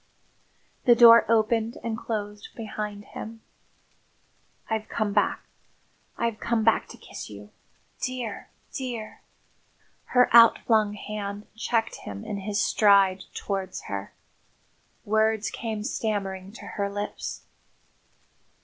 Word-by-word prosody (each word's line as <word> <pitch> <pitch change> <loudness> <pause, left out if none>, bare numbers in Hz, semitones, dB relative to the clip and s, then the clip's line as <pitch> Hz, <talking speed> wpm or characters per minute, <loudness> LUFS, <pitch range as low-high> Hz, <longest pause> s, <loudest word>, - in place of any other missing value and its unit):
The 240 - +7
door 230 -1 +8
opened 225 0 +2
and 230 -1 -2
closed 210 -2 -5
behind 210 -2 -5
him. 225 0 -8 1.3
"I've 220 -1 -2
come 215 -2 -1
back. 205 - +1 0.7
I've 230 -2 -1
come 235 -2 0
back 225 0 +3
to - - -12
kiss - - -9
you. 105 0 -11 0.5
Dear 250 -5 -4 0.2
dear!" 240 -5 -5 0.8
Her 250 -1 +4
outflung 220 -2 +6
hand 205 0 -5
checked 225 0 -1
him 100 -1 -8
in 205 - -4
his 205 +1 -2
stride 195 -4 +4
towards 195 -2 -4
her. 100 0 -5 0.9
Words 220 0 +1
came 220 -2 -4
stammering 195 -4 -3
to - - -11
her 200 -1 -3
lips. 205 +1 -5
215 Hz, 110 wpm, -26 LUFS, 200-225 Hz, 1.3 s, door